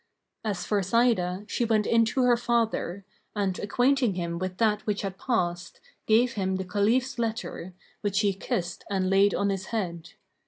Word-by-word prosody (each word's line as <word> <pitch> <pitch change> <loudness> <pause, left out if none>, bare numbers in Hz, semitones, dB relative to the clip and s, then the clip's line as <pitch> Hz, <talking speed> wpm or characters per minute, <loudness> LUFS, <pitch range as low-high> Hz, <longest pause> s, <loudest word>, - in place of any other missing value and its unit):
As 200 -5 -2
for 205 -2 +1
Sa'idah, 195 -3 +1
she 240 - -1
went 220 -2 +2
in 230 -1 +4
to 255 +3 0
her 245 -1 +5
father; 225 -6 -1 0.3
and, 195 -3 -1
acquainting 245 0 +2
him 170 -1 -3
with 185 0 -4
that 215 -1 +2
which 210 -1 -1
had 195 -1 -5
passed, 175 -7 -2 0.3
gave 235 +3 +4
him 190 -2 -1
the 190 0 -3
Caliph's 225 +7 +1
letter, 220 -5 -4 0.3
which 205 -1 +1
he 200 -2 +2
kissed 180 -2 -3
and 190 -2 0
laid 200 +1 +4
on 200 - +1
his 190 -1 -4
head. 170 -7 -4
200 Hz, 170 wpm, -27 LUFS, 185-230 Hz, 0.3 s, her